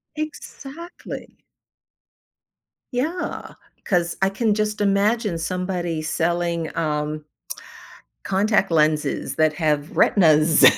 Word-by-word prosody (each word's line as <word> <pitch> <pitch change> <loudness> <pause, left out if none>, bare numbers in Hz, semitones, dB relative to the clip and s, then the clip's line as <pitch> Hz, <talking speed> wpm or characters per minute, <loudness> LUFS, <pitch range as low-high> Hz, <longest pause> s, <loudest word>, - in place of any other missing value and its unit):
Exactly. 310 +1 -8 1.6
Yeah, 315 +9 -3 0.3
'cause 175 -3 0
I 195 - +4
can 210 +2 +1
just 210 0 -1
imagine 205 0 +2
somebody 175 -1 -2
selling 170 +1 -1
um 150 -1 -2 1.0
contact 195 0 +1
lenses 155 -2 +1
that 155 -1 +3
have 150 -1 -1
retinas 155 -4 +4
175 Hz, 85 wpm, -22 LUFS, 155-210 Hz, 1.6 s, I